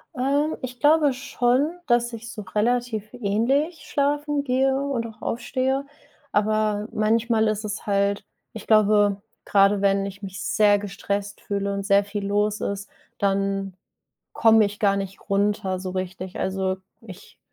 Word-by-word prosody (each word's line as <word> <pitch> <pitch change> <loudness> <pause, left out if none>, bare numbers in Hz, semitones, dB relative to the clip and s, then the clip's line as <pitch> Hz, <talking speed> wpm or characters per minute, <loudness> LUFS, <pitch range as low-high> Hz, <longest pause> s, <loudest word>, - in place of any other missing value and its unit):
Äh, 285 +4 +1
ich 250 -1 -6
glaube 295 -2 +4
schon, 270 +4 0
dass 240 0 +2
ich 230 0 -7
so 210 - -7
relativ 220 +1 -1
ähnlich 250 - 0
schlafen 290 0 0
gehe 265 0 +2
und 270 -5 -2
auch 220 0 -14
aufstehe, 265 +3 -1 0.5
aber 215 0 +1
manchmal 220 +1 +2
ist 215 0 -1
es 210 0 -5
halt 200 0 +1 0.3
ich 220 - -9
glaube, 205 -2 +4 0.2
gerade 200 0 +3
wenn 195 0 +2
ich 200 +1 -8
mich 190 -1 -7
sehr 205 -1 +3
gestresst 200 0 -4
fühle 200 0 -2
und 200 0 -3
sehr 200 0 +4
viel 205 0 -4
los 205 +1 0
ist, 200 0 -3 0.3
dann 195 -1 -1 0.6
komme 225 -2 +5
ich 205 +1 -6
gar 200 -1 +3
nicht 195 0 -7
runter, 200 -2 0
so 185 -1 -5
richtig. 185 0 -5
Also, 190 0 -1 0.3
ich 195 -5 -13
210 Hz, 145 wpm, -24 LUFS, 200-245 Hz, 0.6 s, komme